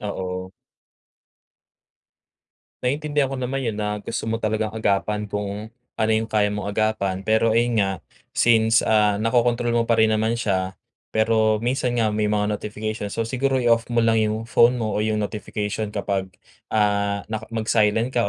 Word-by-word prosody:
Oo. 95 Hz, -2 st, -4 dB, 2.3 s
Naintindihan 145 Hz, 0 st, 0 dB
ko -, -, -3 dB
naman 130 Hz, +1 st, -2 dB
yun 115 Hz, -, 0 dB
na 105 Hz, 0 st, -1 dB
gusto 110 Hz, -, -3 dB
mo 115 Hz, -, 0 dB
talagang 110 Hz, -1 st, -1 dB
agapan 105 Hz, -1 st, -1 dB
kung 105 Hz, +2 st, -5 dB, 0.2 s
ano 110 Hz, 0 st, +1 dB
yung 110 Hz, +1 st, 0 dB
kaya 105 Hz, -1 st, +1 dB
mong 105 Hz, 0 st, -4 dB
agapan 110 Hz, -3 st, 0 dB
pero 110 Hz, +1 st, +2 dB
ayun 120 Hz, -2 st, +2 dB
nga 95 Hz, -1 st, +1 dB, 0.5 s
since, 115 Hz, -1 st, +4 dB
ah, 105 Hz, -2 st, +3 dB
nakokontrol 120 Hz, +2 st, +1 dB
mo 115 Hz, -1 st, +1 dB
pa 115 Hz, -, +3 dB
rin 110 Hz, 0 st, +4 dB
naman 110 Hz, +2 st, +1 dB
siya 95 Hz, -4 st, -1 dB, 0.3 s
pero 110 Hz, 0 st, +2 dB
minsan 125 Hz, -1 st, 0 dB
nga 110 Hz, -2 st, +1 dB
may 105 Hz, 0 st, 0 dB
mga 105 Hz, 0 st, 0 dB
notification. 105 Hz, 0 st, -4 dB
So, 115 Hz, +3 st, -2 dB
siguro 130 Hz, +3 st, 0 dB
i-off 120 Hz, -2 st, +2 dB
mo 120 Hz, -1 st, +2 dB
lang 115 Hz, -1 st, +3 dB
yung 110 Hz, +1 st, -1 dB
phone 120 Hz, +1 st, +4 dB
mo 110 Hz, -3 st, -2 dB
o -, -, -1 dB
yung 110 Hz, 0 st, 0 dB
notification 105 Hz, 0 st, -4 dB
kapag, 100 Hz, -2 st, -2 dB, 0.4 s
ah, 100 Hz, -1 st, +1 dB
naka 110 Hz, 0 st, -4 dB
mag-silent 110 Hz, +1 st, +1 dB
ka 115 Hz, -4 st, +1 dB
110 Hz, 160 wpm, -23 LUFS, 105-115 Hz, 2.3 s, since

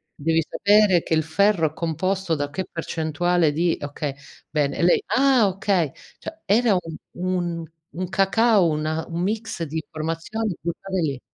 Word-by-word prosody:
Devi 165 Hz, +2 st, +1 dB
sapere 205 Hz, -4 st, +4 dB
che -, -, -2 dB
il 160 Hz, -, +3 dB
ferro 170 Hz, +1 st, +2 dB
è 155 Hz, -, -20 dB
composto 180 Hz, +2 st, -1 dB
da 145 Hz, -2 st, -1 dB
che 185 Hz, +6 st, -4 dB
percentuale 165 Hz, 0 st, 0 dB
di 165 Hz, +3 st, +1 dB
okay 145 Hz, -1 st, -4 dB, 0.3 s
bene". 145 Hz, -3 st, 0 dB
E -, -, -2 dB
lei: 175 Hz, -, +4 dB
"Ah 260 Hz, -5 st, +4 dB
okay". 190 Hz, -5 st, 0 dB, 0.3 s
Cioè 320 Hz, -, -9 dB
era 220 Hz, +2 st, +3 dB
u 180 Hz, -, +2 dB, 0.4 s
un 175 Hz, -2 st, -1 dB, 0.3 s
un 180 Hz, +2 st, -5 dB
cacao, 195 Hz, +1 st, +3 dB
una 155 Hz, +1 st, -1 dB
un 170 Hz, +1 st, -4 dB
mix 215 Hz, -1 st, -3 dB
di 155 Hz, 0 st, -6 dB
informazioni 165 Hz, +6 st, -3 dB
buttate 175 Hz, +4 st, -3 dB
lì. 140 Hz, -5 st, -1 dB
170 Hz, 160 wpm, -23 LUFS, 160-195 Hz, 0.4 s, sapere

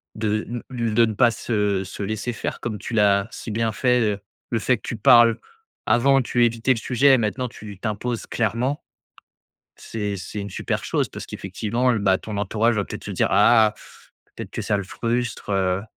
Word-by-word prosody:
de 110 Hz, 0 st, -1 dB
ne 120 Hz, 0 st, -5 dB
lu 120 Hz, -3 st, -2 dB
de 115 Hz, +1 st, +5 dB
ne 110 Hz, -, -3 dB
pas 120 Hz, +3 st, +4 dB
se 105 Hz, -5 st, -1 dB
se 95 Hz, +2 st, -7 dB
laisser 110 Hz, +4 st, -3 dB
faire, -, -, -4 dB
comme 110 Hz, -3 st, -4 dB
tu 115 Hz, -, -7 dB
l'as 100 Hz, -2 st, +3 dB
si -, -, -8 dB
bien 110 Hz, +1 st, 0 dB
fait. 125 Hz, +2 st, +2 dB
Heu, 105 Hz, -3 st, 0 dB, 0.3 s
le 115 Hz, -, +1 dB
fait 125 Hz, +2 st, +2 dB
que -, -, -26 dB
tu -, -, -3 dB
parles. 115 Hz, +1 st, +6 dB, 0.5 s
Avant, 135 Hz, +4 st, +4 dB
tu 120 Hz, -1 st, +2 dB
évitais 115 Hz, +2 st, +1 dB
le -, -, -5 dB
sujet, 130 Hz, +2 st, +4 dB
maintenant, 120 Hz, +3 st, -1 dB
tu 105 Hz, -4 st, -11 dB
t'imposes 115 Hz, +3 st, -3 dB
clairement. 120 Hz, +6 st, -1 dB, 0.9 s
C'est 105 Hz, -3 st, -4 dB
c'est 95 Hz, +3 st, -6 dB
une 100 Hz, -, -6 dB
super -, -, -3 dB
chose -, -, 0 dB
parce -, -, -8 dB
qu'effectivement, 115 Hz, +6 st, -1 dB
bah, 95 Hz, -3 st, +2 dB
ton 105 Hz, -, -7 dB
entourage 110 Hz, +3 st, +1 dB
va 100 Hz, -, 0 dB
peut-être -, -, -8 dB
se -, -, -5 dB
dire: -, -, +1 dB
«Ah! 110 Hz, -3 st, +5 dB, 0.6 s
Peut-être -, -, -8 dB
que -, -, -4 dB
ça 105 Hz, -, +1 dB
le 100 Hz, -, -3 dB
frustre, 115 Hz, +2 st, -3 dB
heu. 95 Hz, -1 st, +1 dB
110 Hz, 195 wpm, -23 LUFS, 105-120 Hz, 0.9 s, parles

